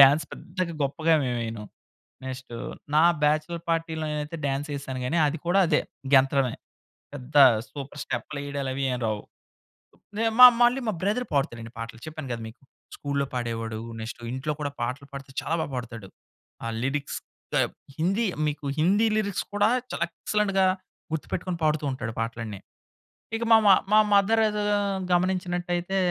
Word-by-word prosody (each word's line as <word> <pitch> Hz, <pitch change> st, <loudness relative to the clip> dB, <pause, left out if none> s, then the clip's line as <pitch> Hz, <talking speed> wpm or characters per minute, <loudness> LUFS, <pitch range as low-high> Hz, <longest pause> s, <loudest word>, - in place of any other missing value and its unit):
Dance 140 Hz, +3 st, +8 dB
పెద్దగా 175 Hz, +1 st, -4 dB
గొప్పగా 155 Hz, +4 st, +2 dB
మేము 125 Hz, -1 st, -1 dB
వెయ్యను. 115 Hz, -2 st, -5 dB, 0.6 s
నెక్స్ట్ 130 Hz, -2 st, -7 dB, 0.4 s
నా 155 Hz, -, +6 dB, 0.2 s
బ్యాచలర్ 155 Hz, +3 st, +1 dB
పార్టీ‌లో 165 Hz, -1 st, -1 dB
నేనైతే 150 Hz, +2 st, -4 dB
డాన్స్ 140 Hz, +2 st, -1 dB
చేసాను 135 Hz, -2 st, -5 dB
గానీ, 165 Hz, +7 st, 0 dB
అది 155 Hz, +3 st, -2 dB
కూడా 185 Hz, +3 st, +3 dB
అదే 150 Hz, -, +3 dB, 0.3 s
గెంతడమే 135 Hz, -2 st, +4 dB, 0.6 s
పెద్ద 145 Hz, +1 st, -9 dB, 0.4 s
సూపర్ 140 Hz, 0 st, -8 dB
స్టెప్‌లు 145 Hz, -, -4 dB
వెయ్యడాలు 140 Hz, -1 st, -3 dB
అవి 140 Hz, -, -2 dB
ఏం 125 Hz, -, -1 dB
రావు. 105 Hz, -1 st, -1 dB, 1.0 s
మా 225 Hz, -, +2 dB
మా 250 Hz, -, +14 dB, 0.2 s
మళ్ళీ 245 Hz, +3 st, +4 dB
మా 215 Hz, -, +1 dB
బ్రదర్ 210 Hz, +6 st, 0 dB
పాడుతాడండి 120 Hz, -5 st, -1 dB
పాటలు 115 Hz, 0 st, -7 dB
చెప్పాను 155 Hz, -2 st, -7 dB
కదా! 115 Hz, -, -5 dB
మీకు 110 Hz, -, -13 dB, 0.3 s
స్కూల్లో 140 Hz, -1 st, -1 dB
పాడేవాడు. 115 Hz, -2 st, -3 dB, 0.2 s
నెక్స్ట్ 110 Hz, +1 st, -6 dB
ఇంట్లో 135 Hz, +4 st, -2 dB
కూడా 145 Hz, -1 st, -2 dB
పాటలు 130 Hz, +4 st, -3 dB
పాడితే 135 Hz, -1 st, -8 dB
చాలా 160 Hz, -, -1 dB
బాగా 150 Hz, -, -4 dB
పాడతాడు. 115 Hz, -5 st, -6 dB, 0.6 s
ఆ -, -, -2 dB, 0.2 s
లిరిక్స్ 140 Hz, +2 st, -2 dB, 0.3 s
టబ్ -, -, +2 dB, 0.2 s
హిందీ 195 Hz, +8 st, +1 dB, 0.2 s
మీకు 150 Hz, -1 st, -4 dB
హిందీ 200 Hz, +7 st, +4 dB
లిరిక్స్ 200 Hz, -3 st, -1 dB
కూడా 205 Hz, +1 st, +3 dB, 0.2 s
చాలా -, -, -1 dB
ఎక్సలెంట్‌గా 195 Hz, 0 st, +1 dB, 0.5 s
గుర్తుపెట్టుకొని 175 Hz, +2 st, -3 dB
పాడుతూ 155 Hz, -1 st, +2 dB
ఉంటాడు 115 Hz, -4 st, -4 dB
పాటలన్నీ. 115 Hz, -3 st, -4 dB, 0.8 s
ఇక 230 Hz, -, -2 dB
మా 225 Hz, -, +10 dB
మ -, -, +8 dB, 0.2 s
మా -, -, +8 dB, 0.2 s
మదర్ 210 Hz, +3 st, +4 dB
ఏదో 210 Hz, 0 st, -2 dB, 0.5 s
గమనించినట్టైతే 175 Hz, 0 st, 0 dB
150 Hz, 150 wpm, -26 LUFS, 130-175 Hz, 1.0 s, మా